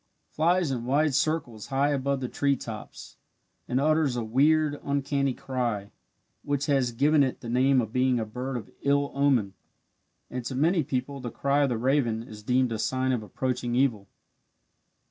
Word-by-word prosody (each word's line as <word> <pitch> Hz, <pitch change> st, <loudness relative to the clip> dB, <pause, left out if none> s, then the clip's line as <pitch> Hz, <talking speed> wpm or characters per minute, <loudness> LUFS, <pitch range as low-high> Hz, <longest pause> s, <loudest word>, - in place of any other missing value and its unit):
Flies 170 Hz, 0 st, +2 dB
in 120 Hz, -3 st, -3 dB
wide 145 Hz, +3 st, +2 dB
circles 130 Hz, -8 st, -1 dB
high 140 Hz, +2 st, +1 dB
above 140 Hz, -1 st, -1 dB
the 125 Hz, -, -2 dB
tree 140 Hz, +2 st, +1 dB
tops, 115 Hz, -4 st, -9 dB, 0.5 s
and 125 Hz, -, 0 dB
utters 155 Hz, -2 st, +2 dB
a 120 Hz, -, -2 dB
weird, 145 Hz, +6 st, +2 dB
uncanny 140 Hz, -1 st, 0 dB
cry, 120 Hz, -6 st, -3 dB, 0.5 s
which 145 Hz, 0 st, -1 dB
has 135 Hz, -4 st, +1 dB
given 145 Hz, +5 st, +3 dB
it 130 Hz, -2 st, 0 dB
the 115 Hz, -, -7 dB
name 130 Hz, +2 st, +3 dB
of 110 Hz, -2 st, -3 dB
being 130 Hz, -1 st, +2 dB
a 110 Hz, -, -2 dB
bird 125 Hz, +4 st, -4 dB
of 110 Hz, -, -9 dB
ill 140 Hz, 0 st, +1 dB
omen, 135 Hz, -8 st, +2 dB, 0.7 s
and 125 Hz, -1 st, -5 dB
to 130 Hz, -, -4 dB
many 165 Hz, +6 st, +3 dB
people 135 Hz, 0 st, -3 dB
the 125 Hz, -2 st, -5 dB
cry 140 Hz, +4 st, +1 dB
of 140 Hz, -, +2 dB
the 120 Hz, -, -1 dB
raven 120 Hz, -2 st, +1 dB
is 105 Hz, -2 st, -11 dB
deemed 125 Hz, +2 st, +1 dB
a 110 Hz, -, -3 dB
sign 130 Hz, +2 st, 0 dB
of 125 Hz, -3 st, 0 dB
approaching 120 Hz, +3 st, -2 dB
evil. 120 Hz, -7 st, +1 dB
130 Hz, 175 wpm, -27 LUFS, 120-140 Hz, 0.7 s, given